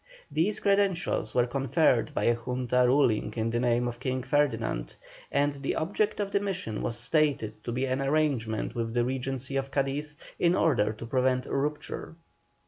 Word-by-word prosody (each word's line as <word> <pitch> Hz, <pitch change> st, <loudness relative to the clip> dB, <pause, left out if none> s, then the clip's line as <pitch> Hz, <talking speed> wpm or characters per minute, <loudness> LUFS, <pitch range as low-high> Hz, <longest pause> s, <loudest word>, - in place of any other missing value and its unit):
These 165 Hz, +8 st, +1 dB
credentials 195 Hz, -, +1 dB
were 120 Hz, -1 st, +4 dB
conferred 135 Hz, 0 st, +2 dB
by -, -, 0 dB
a 120 Hz, -, +4 dB
Junta 125 Hz, +1 st, 0 dB
ruling 120 Hz, -5 st, +2 dB
in 115 Hz, 0 st, 0 dB
the 120 Hz, -, 0 dB
name 120 Hz, 0 st, +2 dB
of 120 Hz, 0 st, -5 dB
King 130 Hz, 0 st, -2 dB
Ferdinand, 120 Hz, -, 0 dB, 0.4 s
and 145 Hz, +1 st, +2 dB
the 140 Hz, -1 st, -3 dB
object 205 Hz, +6 st, 0 dB
of 200 Hz, -1 st, -1 dB
the 200 Hz, -, +2 dB
mission 185 Hz, -, -3 dB
was 115 Hz, -, -2 dB
stated 125 Hz, -9 st, 0 dB
to 120 Hz, -, -3 dB
be 130 Hz, +3 st, 0 dB
an 130 Hz, +1 st, -1 dB
arrangement 135 Hz, -7 st, 0 dB
with 115 Hz, -1 st, -3 dB
the 120 Hz, 0 st, +2 dB
Regency 130 Hz, +1 st, -3 dB
of 135 Hz, 0 st, -2 dB
Cadiz 140 Hz, +2 st, -2 dB, 0.2 s
in 175 Hz, +1 st, +3 dB
order 140 Hz, -, +2 dB
to 110 Hz, +2 st, -8 dB
prevent 130 Hz, +1 st, +1 dB
a -, -, -4 dB
rupture. 150 Hz, +3 st, -3 dB
130 Hz, 175 wpm, -28 LUFS, 120-150 Hz, 0.4 s, were